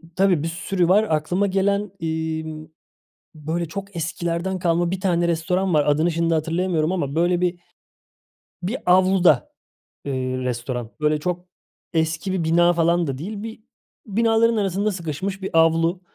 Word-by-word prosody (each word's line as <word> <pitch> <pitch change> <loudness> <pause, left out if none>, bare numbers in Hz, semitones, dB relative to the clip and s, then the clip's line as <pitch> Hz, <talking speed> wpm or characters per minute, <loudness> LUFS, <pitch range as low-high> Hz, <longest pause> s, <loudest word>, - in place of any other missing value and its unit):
tabii 185 -5 +3
bir - - -1
sürü 175 +1 -1
var. 205 +4 +5
Aklıma 175 +6 +1
gelen, 200 +1 0
emm, 160 -1 -3 0.7
böyle 160 +3 -3
çok 200 +2 -7
eskilerden 170 +3 -2
kalma 170 0 +1
bir 190 - -2
tane 175 -3 +1
restoran 180 +2 0
var. 150 -1 +3
Adını 155 +4 +2
şimdi 165 0 +1
hatırlayamıyorum 165 +1 0
ama 145 -6 -2
böyle 175 +1 +2
bir 175 -1 0 1.0
bir 220 +9 -2
avluda, 185 -5 +4 0.5
eee, 140 - -2 0.2
restoran. 125 -2 -3
Böyle 150 0 +1
çok 180 +2 -3 0.5
eski 160 +4 0
bir 175 -3 -1
bina 175 +2 +4
falan 170 0 +2
da 135 -1 -3
değil. 200 +7 -6
Bir 225 0 -7 0.5
binaların 225 +2 +2
arasında 200 +1 0
sıkışmış 185 +3 -4
bir 190 -3 -2
avlu. 165 +2 +2
170 Hz, 145 wpm, -22 LUFS, 160-190 Hz, 1.0 s, var